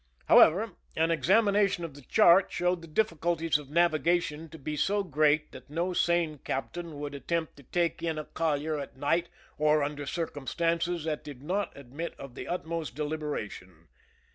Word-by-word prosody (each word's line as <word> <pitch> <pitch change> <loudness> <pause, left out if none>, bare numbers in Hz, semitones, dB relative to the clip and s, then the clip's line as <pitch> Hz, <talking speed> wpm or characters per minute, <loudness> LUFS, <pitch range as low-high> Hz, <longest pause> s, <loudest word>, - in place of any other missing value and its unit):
However, 200 +7 +6 0.2
an 165 +1 +2
examination 195 - +3
of 160 - -8
the 145 - -13
chart 185 - +5
showed 180 0 0
the 165 - -10
difficulties 165 -3 +1
of 145 -2 -11
navigation 165 0 +1
to 160 - -10
be 150 +1 -4
so 200 +6 +1
great 155 -2 +2
that - - -12
no 170 +4 -1
sane 170 -4 +1
captain 160 +5 -4
would 145 0 -5
attempt 160 +4 -2
to 140 - -14
take 170 +2 0
in 165 -2 -1
a 155 - -4
collier 155 -1 -1
at 140 -1 -8
night 165 +5 +1 0.3
or 150 0 +4
under 145 0 -4
circumstances 165 +2 -1
that 155 -2 -3
did 140 -3 -10
not 195 +6 -1
admit 140 +5 -6
of 135 -3 -9
the - - -7
utmost 165 -5 -3
deliberation. 145 - -5
160 Hz, 165 wpm, -29 LUFS, 145-170 Hz, 0.3 s, However